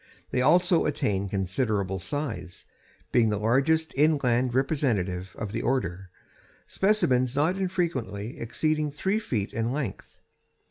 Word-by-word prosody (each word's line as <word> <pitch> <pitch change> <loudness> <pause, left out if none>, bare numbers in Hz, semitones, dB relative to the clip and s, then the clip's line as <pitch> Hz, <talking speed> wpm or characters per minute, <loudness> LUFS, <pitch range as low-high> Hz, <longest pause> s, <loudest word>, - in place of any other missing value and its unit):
They 125 - +1
also 175 +5 +4
attain 100 -9 -1
considerable 95 0 -1
size, 105 - -5 0.5
being 115 -3 +4
the 105 - 0
largest 135 +9 +2
inland 130 -5 +2
representative 105 - 0
of 105 -3 -4
the 115 - -2
order, 95 -8 -1 0.6
specimens 130 - +2
not 155 +6 +2
infrequently 165 - -2
exceeding 155 +5 0
three 190 +9 -1
feet 115 - -3
in 115 +1 -1
length. 140 -1 -5
125 Hz, 120 wpm, -27 LUFS, 105-155 Hz, 0.6 s, also